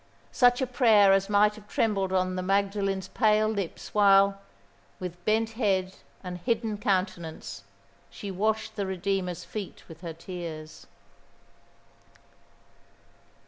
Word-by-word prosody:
Such 245 Hz, 0 st, +4 dB
a -, -, +2 dB
prayer 225 Hz, -6 st, +5 dB
as 195 Hz, 0 st, +1 dB
might 210 Hz, +1 st, +4 dB
have 210 Hz, -1 st, -14 dB
trembled 195 Hz, -4 st, 0 dB
on 185 Hz, -1 st, +1 dB
the 185 Hz, -, -2 dB
Magdalen's 195 Hz, 0 st, 0 dB
pale 215 Hz, -2 st, +3 dB
lips 200 Hz, -5 st, -4 dB
while, 195 Hz, -1 st, +5 dB, 0.6 s
with 180 Hz, -1 st, -7 dB
bent 220 Hz, +1 st, +1 dB
head 195 Hz, -5 st, 0 dB, 0.3 s
and 180 Hz, -1 st, -6 dB
hidden 225 Hz, 0 st, -1 dB
countenance, 185 Hz, -5 st, -2 dB, 0.4 s
she 200 Hz, -, -7 dB
washed 215 Hz, +4 st, -1 dB
the 200 Hz, -2 st, -2 dB
Redeemer's 190 Hz, -1 st, -2 dB
feet 210 Hz, -3 st, -7 dB
with 165 Hz, -1 st, -13 dB
her 170 Hz, -2 st, -6 dB
tears. 165 Hz, -2 st, -8 dB
195 Hz, 120 wpm, -27 LUFS, 185-215 Hz, 0.6 s, prayer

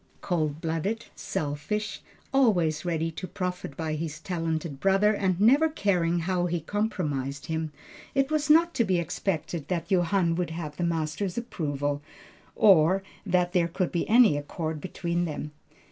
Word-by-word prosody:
Cold 155 Hz, -4 st, -1 dB
blooded, 170 Hz, +8 st, -2 dB
selfish, 150 Hz, +9 st, -3 dB, 0.3 s
always 180 Hz, -, +3 dB
ready 165 Hz, -2 st, -1 dB
to 185 Hz, +3 st, -6 dB
profit 180 Hz, -7 st, -4 dB
by 160 Hz, -1 st, -2 dB
his 155 Hz, 0 st, -4 dB
talented 165 Hz, -4 st, -3 dB
brother, 195 Hz, +4 st, +4 dB
and 190 Hz, -3 st, 0 dB
never 275 Hz, +10 st, +5 dB
caring 175 Hz, -, +1 dB
how 180 Hz, +1 st, 0 dB
he 175 Hz, 0 st, -1 dB
compromised 150 Hz, -8 st, -2 dB
him, 160 Hz, -1 st, -2 dB, 0.4 s
it 275 Hz, +1 st, +2 dB
was 305 Hz, 0 st, 0 dB
not 335 Hz, +3 st, +6 dB
to 235 Hz, -, +2 dB
be 190 Hz, -4 st, +1 dB
expected 170 Hz, -1 st, -2 dB
that 170 Hz, -1 st, -3 dB
Johann 175 Hz, -1 st, +2 dB
would 175 Hz, 0 st, -1 dB
have 160 Hz, -2 st, -5 dB
the -, -, -1 dB
master's 170 Hz, +3 st, -1 dB
approval, 145 Hz, -, -2 dB, 0.5 s
or 190 Hz, -1 st, +5 dB, 0.2 s
that 180 Hz, -1 st, +2 dB
there 175 Hz, -2 st, +3 dB
could 175 Hz, +1 st, -1 dB
be 170 Hz, -, -1 dB
any 230 Hz, -7 st, +6 dB
accord 155 Hz, +1 st, -4 dB
between 175 Hz, -1 st, -2 dB
them. 150 Hz, -1 st, -5 dB
175 Hz, 150 wpm, -27 LUFS, 160-195 Hz, 0.5 s, not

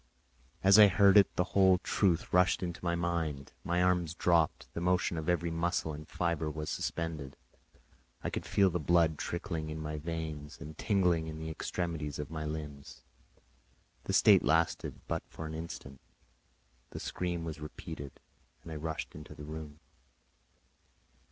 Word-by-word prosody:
As 95 Hz, +2 st, +8 dB
I 105 Hz, -, +11 dB
heard 100 Hz, +1 st, +5 dB
it, 100 Hz, -2 st, +8 dB
the 90 Hz, -, +2 dB
whole 95 Hz, -2 st, +6 dB
truth 90 Hz, -2 st, 0 dB
rushed 90 Hz, +1 st, +4 dB
into 85 Hz, -1 st, -5 dB
my 85 Hz, -1 st, +1 dB
mind, 85 Hz, -5 st, -2 dB
my 85 Hz, +1 st, +1 dB
arms 90 Hz, -3 st, +1 dB
dropped, 85 Hz, -3 st, +2 dB
the 85 Hz, -, -4 dB
motion 90 Hz, 0 st, +1 dB
of 80 Hz, +1 st, -3 dB
every 85 Hz, -1 st, +1 dB
muscle 85 Hz, -1 st, -1 dB
and 75 Hz, +1 st, -9 dB
fibre 85 Hz, -3 st, -1 dB
was 75 Hz, 0 st, -4 dB
suspended; 80 Hz, -5 st, -3 dB, 0.9 s
I -, -, -2 dB
could -, -, -4 dB
feel 95 Hz, -2 st, +4 dB
the 90 Hz, -, -1 dB
blood 80 Hz, 0 st, +3 dB
trickling 80 Hz, -2 st, -3 dB
in 80 Hz, 0 st, -5 dB
my 75 Hz, 0 st, -4 dB
veins 80 Hz, -2 st, -5 dB
and 80 Hz, 0 st, -8 dB
tingling 90 Hz, -4 st, +2 dB
in 80 Hz, -1 st, -6 dB
the 80 Hz, 0 st, -5 dB
extremities 80 Hz, -3 st, -3 dB
of 75 Hz, +1 st, -5 dB
my 80 Hz, -1 st, -4 dB
limbs. 75 Hz, -2 st, -7 dB, 1.0 s
This -, -, +3 dB
state -, -, +7 dB
lasted 80 Hz, +1 st, +1 dB
but -, -, -1 dB
for 80 Hz, -, -7 dB
an 80 Hz, -, -5 dB
instant; 80 Hz, -4 st, -7 dB, 0.9 s
the -, -, -7 dB
scream 85 Hz, -2 st, -3 dB
was 80 Hz, -1 st, -5 dB
repeated, 75 Hz, -2 st, -8 dB, 0.4 s
and 80 Hz, -, -9 dB
I 80 Hz, -, -4 dB
rushed 80 Hz, +1 st, -4 dB
into 75 Hz, 0 st, -10 dB
the 75 Hz, -, -9 dB
room. 75 Hz, 0 st, -8 dB
80 Hz, 160 wpm, -32 LUFS, 75-85 Hz, 1.0 s, I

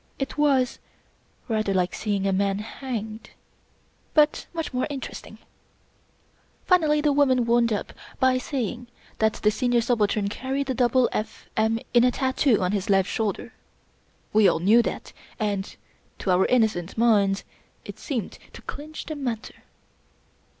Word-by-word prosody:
It 270 Hz, -, -4 dB
was 275 Hz, -4 st, +2 dB, 0.7 s
rather 215 Hz, -4 st, 0 dB
like 180 Hz, -1 st, +1 dB
seeing 200 Hz, -2 st, -2 dB
a 195 Hz, -, +1 dB
man 195 Hz, 0 st, +1 dB
hanged; 220 Hz, 0 st, -6 dB, 0.9 s
but 300 Hz, -1 st, +3 dB
much 325 Hz, -4 st, -4 dB
more 250 Hz, -, 0 dB
interesting. 275 Hz, -3 st, -7 dB, 1.3 s
Finally, 310 Hz, -5 st, +3 dB
the 295 Hz, -1 st, +2 dB
woman 260 Hz, -4 st, +3 dB
wound 235 Hz, 0 st, +3 dB
up 205 Hz, -, -3 dB, 0.3 s
by 260 Hz, -1 st, +3 dB
saying 245 Hz, -2 st, -4 dB, 0.3 s
that 220 Hz, 0 st, +3 dB
the 210 Hz, -, +1 dB
Senior 245 Hz, +2 st, +1 dB
Subaltern 215 Hz, -3 st, +1 dB
carried 265 Hz, +6 st, -3 dB
a -, -, 0 dB
double 250 Hz, 0 st, +3 dB
F. 215 Hz, -, -4 dB
M. 220 Hz, +1 st, +1 dB
in 245 Hz, +1 st, +5 dB
tattoo 260 Hz, -4 st, +1 dB
on 180 Hz, -, +1 dB
his 200 Hz, -1 st, -2 dB
left 195 Hz, -1 st, +3 dB
shoulder. 220 Hz, +2 st, -2 dB, 0.8 s
We 215 Hz, -1 st, +6 dB
all -, -, +3 dB
knew 205 Hz, +8 st, +5 dB
that, -, -, -5 dB, 0.3 s
and 205 Hz, -3 st, -2 dB, 0.4 s
to 190 Hz, -, -1 dB
our 180 Hz, +1 st, +3 dB
innocent 215 Hz, -8 st, +1 dB
minds 205 Hz, -4 st, +3 dB, 0.4 s
it -, -, -9 dB
seemed 245 Hz, -, -4 dB
to -, -, -12 dB
clinch 305 Hz, +1 st, -7 dB
the 310 Hz, -, -5 dB
matter. 245 Hz, -6 st, -5 dB
235 Hz, 145 wpm, -25 LUFS, 205-260 Hz, 1.3 s, We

